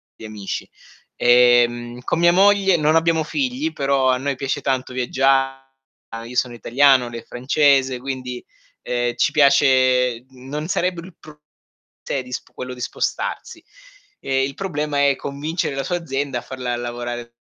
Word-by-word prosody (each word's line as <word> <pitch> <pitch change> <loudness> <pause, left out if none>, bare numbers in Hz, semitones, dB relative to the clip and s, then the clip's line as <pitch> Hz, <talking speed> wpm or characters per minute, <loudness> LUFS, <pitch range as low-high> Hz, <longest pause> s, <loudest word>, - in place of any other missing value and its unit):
gli - - -11
amici. 105 -2 -6 0.5
Ehm, 120 0 +3
con 165 - -2
mia 170 0 +5
moglie 195 0 +4
non 155 0 +2
abbiamo 165 -1 +2
figli, 270 - -2
però 135 -1 +1
a 130 - +1
noi 140 +1 -2
piace 135 +2 -3
tanto 130 -1 -2
viaggia 135 +1 +1 0.6
io 125 +2 -9
sono 125 -1 0
italiano, 130 +1 +3
lei 115 -1 -7
è - - -21
francese, 135 0 +2
quindi, 125 -1 -6 0.4
ehm, 120 -1 -1
ci 120 - +1
piace 130 -4 +4
d - - -30
non 135 +4 -6
sarebbe 180 -1 -1
il 185 -2 -14
pru 155 -1 -15 0.6
cioè, 140 - -2
di 125 - -13
sp - - -9
quello 125 0 -6
di 125 - -11
spostarsi. - - -4 0.6
Ehm, 135 0 0
il 135 - -5
problema 150 -6 -1
è 140 - +2
convincere 145 +2 -3
la 135 - -2
sua 175 - -2
azienda 140 -5 -3
a - - -11
farla 125 -2 -4
lavorare 120 0 -6
135 Hz, 160 wpm, -21 LUFS, 125-150 Hz, 0.6 s, mia